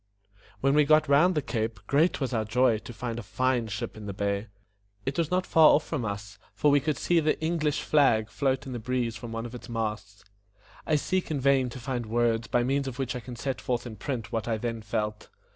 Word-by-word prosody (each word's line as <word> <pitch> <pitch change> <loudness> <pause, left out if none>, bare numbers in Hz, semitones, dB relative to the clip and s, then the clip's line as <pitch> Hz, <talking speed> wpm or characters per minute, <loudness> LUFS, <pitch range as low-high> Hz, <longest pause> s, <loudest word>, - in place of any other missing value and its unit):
When 135 +1 +3
we 150 +1 +5
got 155 +1 +4
round 155 +6 +4
the 150 - 0
cape, 110 -5 -2
great 150 - +2
was 135 -3 -2
our 110 -2 +1
joy 115 +1 +2
to 115 - -10
find 120 0 -4
a - - -4
fine 120 +4 0
ship 110 +3 -5
in 105 -1 -8
the 100 - -5
bay. 100 +2 -1 0.6
It 135 - -2
was 165 -2 +1
not 180 0 +1
far 160 -1 +6
off 150 - 0
from 140 -8 -3
us, 100 -1 -6 0.2
for 145 - +3
we 145 - +5
could 150 0 -1
see 175 -1 +2
the 155 -1 +1
ENG 165 +1 -1
LISH 150 -1 0
flag 110 -8 +3
float 135 +1 0
in 130 - -6
the 120 - -4
breeze 120 0 -1
from 115 +1 -7
one 115 0 -4
of 120 - -8
its 125 - -9
masts. 110 -3 -4 0.6
I 155 - +3
seek 185 +5 0
in 150 -3 -1
vain 135 -1 +3
to 130 - -8
find 120 -2 -3
words 115 0 +1
by 120 - +2
means 135 +2 0
of 125 -2 -5
which 130 -3 -2
I - - -3
can 125 0 -9
set 130 +2 -3
forth 120 -1 -2
in 115 -3 -7
print 115 +1 -4
what 115 0 -2
I 115 -2 0
then 115 0 -3
felt. 105 0 -3
120 Hz, 245 wpm, -28 LUFS, 110-140 Hz, 0.6 s, far